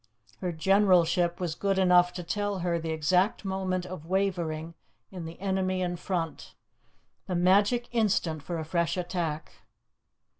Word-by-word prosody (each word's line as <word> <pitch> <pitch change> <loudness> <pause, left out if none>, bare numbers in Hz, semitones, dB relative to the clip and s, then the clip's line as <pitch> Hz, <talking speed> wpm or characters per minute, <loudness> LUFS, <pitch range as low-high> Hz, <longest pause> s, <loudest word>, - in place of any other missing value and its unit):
Her 180 -2 -2
generalship 175 -1 +3
was 175 -3 -2
good 195 +3 -1
enough 180 -1 +5
to 180 - -5
tell 205 +3 -2
her 170 -1 +1
the 160 0 -5
exact 180 +7 +1
moment 190 -1 -2
of 180 -4 -8
wavering 170 -4 -1 0.4
in 180 -3 -7
the 165 +1 -9
enemy 190 -1 0
in 175 0 -2
front, 170 -3 -4 0.7
the 185 - -2
magic 205 +7 +3
instant 195 -9 +1
for 170 +4 -4
a 160 - -4
fresh 170 +1 0
attack. 170 -3 -3
180 Hz, 145 wpm, -28 LUFS, 170-190 Hz, 0.7 s, enough